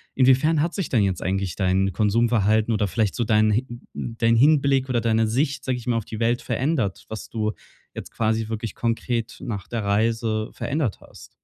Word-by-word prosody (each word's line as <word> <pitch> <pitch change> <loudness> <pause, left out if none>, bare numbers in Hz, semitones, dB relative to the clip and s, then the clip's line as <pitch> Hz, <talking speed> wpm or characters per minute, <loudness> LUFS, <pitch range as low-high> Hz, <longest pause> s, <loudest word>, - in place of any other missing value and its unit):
Inwiefern 135 +4 +4
hat 170 +2 -1
sich 195 -5 -3
denn 115 -5 +2
jetzt 95 -3 -1
eigentlich 95 0 -1
dein 95 0 +1
Konsumverhalten 110 +1 +2
oder 105 -1 +1
vielleicht 105 +1 0
so 120 - 0
dein 110 -1 +3
hi 120 +5 0 0.3
dein 115 0 0
Hinblick 135 0 +3
oder 120 -2 +1
deine 110 -1 +2
Sicht, 135 +3 -1
sage 130 -2 0
ich 125 0 -10
mal, 120 -1 +1
auf 110 - -3
die 110 - -7
Welt 120 +1 +1
verändert, 130 - -1
was 110 - -7
du 110 -1 -2 0.4
jetzt - - -8
quasi 110 0 -1
wirklich 110 -1 -4
konkret 115 0 -2
nach 105 -6 -5
der 115 -3 -3
Reise 110 +1 0
verändert 140 -7 -2
hast? - - -14
115 Hz, 190 wpm, -23 LUFS, 105-125 Hz, 0.4 s, Inwiefern